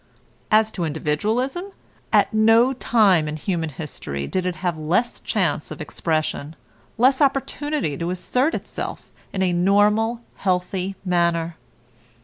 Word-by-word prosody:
As 220 Hz, 0 st, +4 dB
to 185 Hz, -, -3 dB
individualism, 210 Hz, -, -1 dB, 0.5 s
at -, -, +3 dB
no 225 Hz, +4 st, +5 dB
time 205 Hz, -10 st, +3 dB
in 150 Hz, -, -3 dB
human 165 Hz, 0 st, -2 dB
history 130 Hz, -, -5 dB
did 185 Hz, -, -1 dB
it 180 Hz, -, -2 dB
have 175 Hz, -3 st, -2 dB
less 170 Hz, +10 st, 0 dB
chance 175 Hz, -8 st, -1 dB
of 155 Hz, -, -8 dB
expression, 155 Hz, -1 st, -2 dB, 0.4 s
less 260 Hz, +4 st, +4 dB
opportunity 280 Hz, -, 0 dB
to 170 Hz, +4 st, -3 dB
assert 250 Hz, -, 0 dB
itself -, -, -6 dB, 0.2 s
in 190 Hz, -, -1 dB
a 180 Hz, -1 st, +1 dB
normal, 210 Hz, +6 st, +3 dB, 0.2 s
healthy 185 Hz, 0 st, -1 dB
manner. 170 Hz, -2 st, +1 dB
185 Hz, 130 wpm, -22 LUFS, 165-225 Hz, 0.5 s, no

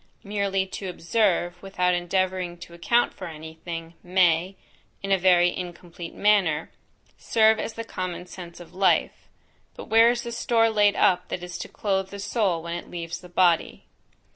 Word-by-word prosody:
Merely 200 Hz, -2 st, -1 dB
to 190 Hz, 0 st, -6 dB
observe, 175 Hz, -1 st, 0 dB
without 180 Hz, -2 st, 0 dB
endeavouring 180 Hz, 0 st, -1 dB
to 170 Hz, 0 st, -12 dB
account 235 Hz, +8 st, +1 dB
for 185 Hz, -, -8 dB
any 160 Hz, 0 st, -9 dB
thing, 165 Hz, -1 st, -6 dB
may, 180 Hz, 0 st, +2 dB, 0.5 s
(in 195 Hz, -, -3 dB
a 195 Hz, -, +5 dB
very 175 Hz, -1 st, +4 dB
incomplete 175 Hz, -1 st, -8 dB
manner) 190 Hz, -7 st, +2 dB, 0.5 s
serve 220 Hz, -1 st, +3 dB
as 225 Hz, -, -4 dB
the 230 Hz, -, -5 dB
common 185 Hz, -5 st, -5 dB
sense 180 Hz, -1 st, -10 dB
of 175 Hz, -, -13 dB
life; 190 Hz, +1 st, +1 dB, 0.5 s
but -, -, -10 dB
where 225 Hz, +1 st, +6 dB
is 240 Hz, 0 st, -1 dB
the 235 Hz, -, -5 dB
store 230 Hz, -2 st, +2 dB
laid 205 Hz, -1 st, +3 dB
up 180 Hz, 0 st, +3 dB
that 180 Hz, -, -5 dB
is 180 Hz, -1 st, -7 dB
to -, -, -5 dB
clothe 195 Hz, -2 st, -2 dB
the 200 Hz, -, -8 dB
soul 200 Hz, -5 st, -1 dB
when 170 Hz, 0 st, -5 dB
it 175 Hz, -, -6 dB
leaves 170 Hz, 0 st, -5 dB
the 180 Hz, -, -13 dB
body? 175 Hz, -2 st, +2 dB
185 Hz, 170 wpm, -25 LUFS, 175-200 Hz, 0.5 s, where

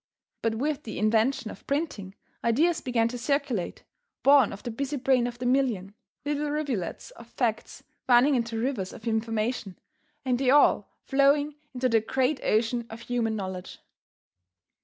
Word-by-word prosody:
But 225 Hz, -1 st, 0 dB
with 290 Hz, +4 st, -1 dB
the 220 Hz, -6 st, -7 dB
invention 220 Hz, +2 st, +1 dB
of -, -, -14 dB
printing, 275 Hz, -, -2 dB, 0.3 s
ideas 310 Hz, +8 st, +2 dB
began 235 Hz, -3 st, +1 dB
to 245 Hz, +1 st, -6 dB
circulate, 275 Hz, -6 st, -1 dB, 0.4 s
born 275 Hz, -5 st, +6 dB
of 200 Hz, -, -9 dB
the 240 Hz, -, -4 dB
busy 275 Hz, +5 st, -3 dB
brain 255 Hz, -2 st, +2 dB
of 240 Hz, 0 st, -6 dB
the 245 Hz, -, -5 dB
million 245 Hz, -7 st, +1 dB, 0.3 s
little 295 Hz, 0 st, -1 dB
rivulets 280 Hz, -, -3 dB
of 235 Hz, -, -14 dB
facts 235 Hz, -2 st, -2 dB, 0.3 s
running 250 Hz, +4 st, +6 dB
into 230 Hz, -3 st, -1 dB
rivers 225 Hz, -6 st, -2 dB
of 220 Hz, -, -10 dB
information, 220 Hz, -2 st, -1 dB, 0.5 s
and 250 Hz, -1 st, +1 dB
they 265 Hz, -2 st, +2 dB
all 290 Hz, +2 st, +5 dB, 0.2 s
flowing 285 Hz, +2 st, +3 dB, 0.2 s
into 255 Hz, +1 st, +1 dB
the 225 Hz, -2 st, +3 dB
great 260 Hz, +5 st, 0 dB
ocean 230 Hz, +2 st, +1 dB
of 225 Hz, +1 st, -9 dB
human 235 Hz, -2 st, -1 dB
knowledge. 185 Hz, -3 st, -6 dB
245 Hz, 155 wpm, -27 LUFS, 225-275 Hz, 0.5 s, born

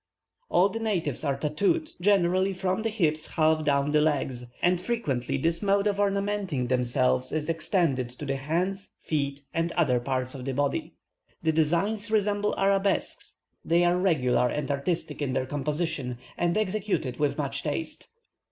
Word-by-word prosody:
All 185 Hz, -, +4 dB
the 225 Hz, -, -4 dB
natives 180 Hz, -, -1 dB
are 140 Hz, -2 st, 0 dB
tattooed, 200 Hz, -, 0 dB
generally 190 Hz, 0 st, +3 dB
from 185 Hz, +2 st, -1 dB
the 225 Hz, -, 0 dB
hips 160 Hz, -7 st, 0 dB
half 155 Hz, -1 st, +2 dB
down 140 Hz, 0 st, +2 dB
the 150 Hz, 0 st, +4 dB
legs, 135 Hz, -5 st, 0 dB, 0.2 s
and 180 Hz, 0 st, +3 dB
frequently 140 Hz, -, -1 dB
this 165 Hz, +4 st, 0 dB
mode 200 Hz, 0 st, +2 dB
of 205 Hz, -1 st, +1 dB
ornamenting 200 Hz, -8 st, 0 dB
themselves 125 Hz, +1 st, +1 dB
is 155 Hz, 0 st, -2 dB
extended 165 Hz, -7 st, 0 dB
to 125 Hz, +4 st, -8 dB
the 135 Hz, -1 st, -1 dB
hands, 175 Hz, +8 st, -2 dB
feet, 140 Hz, -2 st, -2 dB
or 165 Hz, 0 st, +1 dB
other 135 Hz, -8 st, +3 dB
parts 130 Hz, 0 st, -2 dB
of 135 Hz, -3 st, -7 dB
the 135 Hz, 0 st, -3 dB
body. 145 Hz, 0 st, -1 dB, 0.5 s
The 160 Hz, -, +3 dB
designs 175 Hz, +8 st, +1 dB
resemble 210 Hz, -1 st, +1 dB
arabesques; 195 Hz, 0 st, 0 dB, 0.3 s
they 170 Hz, +1 st, +3 dB
are 175 Hz, 0 st, +3 dB
regular 130 Hz, -9 st, +2 dB
and 150 Hz, +2 st, -2 dB
artistic 150 Hz, +3 st, -2 dB
in 135 Hz, -3 st, -1 dB
their 130 Hz, -1 st, 0 dB
composition, 145 Hz, -2 st, -2 dB, 0.2 s
and 175 Hz, +2 st, 0 dB
executed 205 Hz, -, -1 dB
with 145 Hz, -1 st, 0 dB
much 140 Hz, -2 st, -2 dB
taste. 155 Hz, +2 st, -4 dB
160 Hz, 160 wpm, -27 LUFS, 140-195 Hz, 0.5 s, All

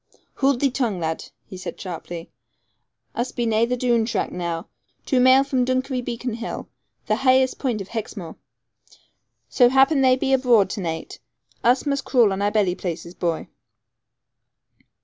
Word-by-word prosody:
'Hould 275 Hz, -2 st, +1 dB
thee 275 Hz, -2 st, +3 dB
tongue, 235 Hz, -8 st, -1 dB
lad,' 160 Hz, -1 st, -3 dB, 0.2 s
he -, -, -10 dB
said 185 Hz, -, -7 dB
sharply; 175 Hz, -2 st, -7 dB, 0.8 s
'us 240 Hz, +2 st, -2 dB
be 240 Hz, -, -2 dB
naigh 225 Hz, 0 st, +2 dB
the 250 Hz, +1 st, -1 dB
Doone 240 Hz, -2 st, +2 dB
track 235 Hz, -, -2 dB
now, 170 Hz, -2 st, -3 dB, 0.4 s
two 260 Hz, -, +2 dB
maile 260 Hz, +2 st, +6 dB
from 265 Hz, -2 st, 0 dB
Dunkery 255 Hz, 0 st, -1 dB
Beacon 240 Hz, 0 st, -4 dB
hill, 235 Hz, +1 st, -5 dB, 0.4 s
the 215 Hz, -, +1 dB
haighest 260 Hz, 0 st, +3 dB
place 240 Hz, -7 st, -1 dB
of 195 Hz, -, -8 dB
Hexmoor. 205 Hz, -7 st, -6 dB, 1.1 s
So 245 Hz, -2 st, +4 dB
happen 270 Hz, +2 st, +4 dB
they 260 Hz, -1 st, +5 dB
be 265 Hz, +1 st, 0 dB
abroad 240 Hz, -7 st, +4 dB
to 205 Hz, -, -4 dB
naight, 165 Hz, -2 st, -5 dB, 0.4 s
us 250 Hz, +4 st, +3 dB
must 280 Hz, -1 st, -1 dB
crawl 235 Hz, -7 st, +3 dB
on 190 Hz, -, -3 dB
our 205 Hz, -, +2 dB
belly 205 Hz, -4 st, +1 dB
places, 175 Hz, -2 st, -5 dB
boy.' 170 Hz, -3 st, -2 dB
235 Hz, 160 wpm, -23 LUFS, 190-260 Hz, 1.1 s, maile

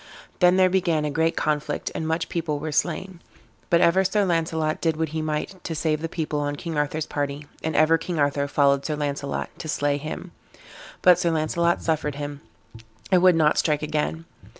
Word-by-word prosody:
Then 180 Hz, 0 st, +5 dB
there 185 Hz, -1 st, +6 dB
began 175 Hz, -5 st, +1 dB
a 150 Hz, -, -1 dB
great 160 Hz, +2 st, +1 dB
conflict, 150 Hz, -1 st, -1 dB
and 160 Hz, -, -3 dB
much 160 Hz, +1 st, -1 dB
people 165 Hz, -3 st, -2 dB
were 155 Hz, +2 st, -4 dB
slain; 185 Hz, +4 st, -2 dB, 0.5 s
but 170 Hz, -, +4 dB
ever 185 Hz, +3 st, +4 dB
Sir 200 Hz, +2 st, +1 dB
Launcelot 160 Hz, -3 st, 0 dB
did 160 Hz, -2 st, +1 dB
what 160 Hz, -1 st, -1 dB
he 160 Hz, +1 st, -3 dB
might 155 Hz, +4 st, -3 dB
to 165 Hz, -, -4 dB
save 155 Hz, -1 st, 0 dB
the 165 Hz, -, -3 dB
people 155 Hz, -3 st, -2 dB
on 145 Hz, 0 st, -2 dB
King 165 Hz, +2 st, -5 dB
Arthur's 150 Hz, +1 st, -1 dB
party, 145 Hz, 0 st, -3 dB, 0.2 s
and 160 Hz, -1 st, -2 dB
ever 160 Hz, +2 st, +4 dB
King 175 Hz, -2 st, -4 dB
Arthur 145 Hz, -1 st, +1 dB
followed 140 Hz, -1 st, +2 dB
Sir 155 Hz, -, -2 dB
Launcelot 140 Hz, -1 st, -3 dB
to -, -, -6 dB
slay 145 Hz, -1 st, 0 dB
him; 155 Hz, +2 st, -6 dB, 0.7 s
but 180 Hz, -1 st, +7 dB
Sir 175 Hz, -, +1 dB
Launcelot 170 Hz, +2 st, +1 dB
suffered 150 Hz, -3 st, -1 dB
him, 145 Hz, 0 st, -6 dB, 0.7 s
and 185 Hz, -2 st, +5 dB
would 185 Hz, -1 st, +6 dB
not 155 Hz, -2 st, +3 dB
strike 150 Hz, -1 st, +1 dB
again. 155 Hz, +2 st, -2 dB
155 Hz, 195 wpm, -24 LUFS, 150-170 Hz, 0.7 s, but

